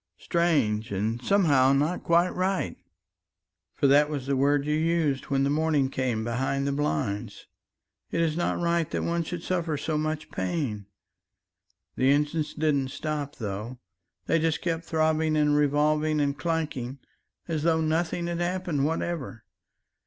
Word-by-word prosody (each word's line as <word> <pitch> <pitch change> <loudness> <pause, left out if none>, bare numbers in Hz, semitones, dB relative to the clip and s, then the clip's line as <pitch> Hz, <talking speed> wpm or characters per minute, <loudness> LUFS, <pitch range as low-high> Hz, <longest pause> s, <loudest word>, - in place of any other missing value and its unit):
strange 145 - +1
and 110 +4 -1
somehow 145 -10 +4
not 150 +6 +1
quite 170 +2 +3
right... 185 - -1 1.0
for - - 0
that 145 +2 +5
was 145 -4 -4
the 140 0 0
word 140 +1 +2
you 150 - 0
used 155 -3 +1
when 135 -1 +1
the - - +2
morning 150 -3 +1
came 125 -5 -1
behind 135 +4 -1
the 140 - 0
blinds 120 -7 -2 0.6
it - - -2
is 165 -2 +1
not 175 - 0
right 170 -1 +1
that - - -2
one 170 0 0
should 170 +1 -5
suffer 170 -4 -1
so 150 +1 -1
much 155 0 -3
pain... 105 - -3 1.1
the 130 - +3
engines 150 +2 +1
didn't 150 -4 +1
stop, 150 0 -4
though, 105 +3 -5 0.5
they 165 - +2
just 160 -1 +1
kept 165 -1 -2
throbbing 155 -1 +1
and 150 -1 +3
revolving 150 +1 +2
and 140 -1 +1
clanking 150 -6 -2 0.5
as 160 -3 -1
though 160 0 +2
nothing 160 +2 0
had 170 0 -3
happened 175 -4 -1
whatever 155 -6 -2
150 Hz, 150 wpm, -27 LUFS, 135-165 Hz, 1.1 s, that